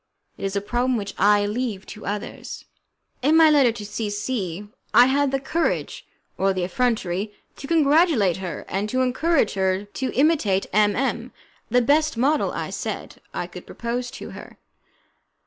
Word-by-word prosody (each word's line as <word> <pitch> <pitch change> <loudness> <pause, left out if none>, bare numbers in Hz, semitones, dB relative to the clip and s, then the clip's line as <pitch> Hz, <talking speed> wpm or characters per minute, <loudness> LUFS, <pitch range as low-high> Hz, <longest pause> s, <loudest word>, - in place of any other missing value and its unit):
It - - -6
is 195 +1 -2
a 200 - +1
problem 245 +4 0
which 200 -2 -5
I 205 +1 +4
leave 210 -2 -3
to 215 - -10
others. 205 +1 -5 0.6
In 300 +5 +4
my 320 -1 +7
letter 275 -5 +5
to 215 -2 -7
C 210 +1 -3
C 205 -3 -3 0.3
I 245 - +9
had 280 +2 +2
the 270 0 0
courage, 330 +5 -2 0.3
or 195 0 +2
the 185 -1 -2
effrontery, 210 -3 -1 0.2
to 275 - -8
congratulate 300 - +3
her, 185 -2 -6
and 200 +3 -2
to 255 +3 0
encourage 260 0 +1
her 190 +1 0
to 255 +5 -4
imitate 265 - +2
M 210 0 +4
M, 245 -1 -1 0.4
the 245 +1 +3
best 305 +1 +2
model, 285 +6 +2
I - - -4
said, - - -5
I - - -3
could - - -11
propose 245 +1 -3
to - - -8
her. - - -11
235 Hz, 165 wpm, -23 LUFS, 205-270 Hz, 0.6 s, I